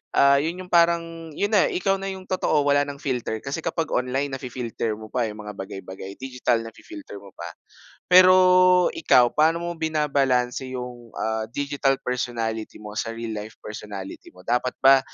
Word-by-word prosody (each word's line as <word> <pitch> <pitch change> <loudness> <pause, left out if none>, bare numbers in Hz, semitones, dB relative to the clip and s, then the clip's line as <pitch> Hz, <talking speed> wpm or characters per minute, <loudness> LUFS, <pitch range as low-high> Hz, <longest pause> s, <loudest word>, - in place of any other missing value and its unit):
ah, 140 0 +6
yun 165 +5 -3
yung 180 - -14
parang 165 -1 +2
yun 205 - 0
na 205 -3 +5
ikaw 195 +2 +1
na 195 - -6
yung 190 -1 -8
totoo 155 -5 +1
wala 145 0 +3
nang 145 - -5
filter, 120 -5 -2
kasi 140 +3 -3
kapag 165 -1 -1
online 130 +3 0
nafi-filter 125 -4 -4
mo 110 0 -11
pa, 125 -2 0
eh, 105 - -6
yung 105 - -9
mga 105 - -6
bagay 95 0 -6
bagay, 95 +1 -8
digital 125 -3 0
nafi-filter 285 - -10
mo 100 -1 -15
pa. 85 0 -7 0.6
Pero 185 0 +9 0.6
ikaw, 125 -6 +4
paano 165 +2 +2
mo 175 - -2
binabalanse 140 -6 0
yung, 120 -1 -8
ah, 110 0 -2
digital 140 +1 0
personality 115 -3 -3
mo 105 -1 -9
sa 115 +1 -2
real 115 -1 -5
life 110 +2 -10
personality 105 -2 -8
mo? 90 - -15
Dapat 125 +1 0
ba 135 0 +8
130 Hz, 180 wpm, -24 LUFS, 115-160 Hz, 0.6 s, Pero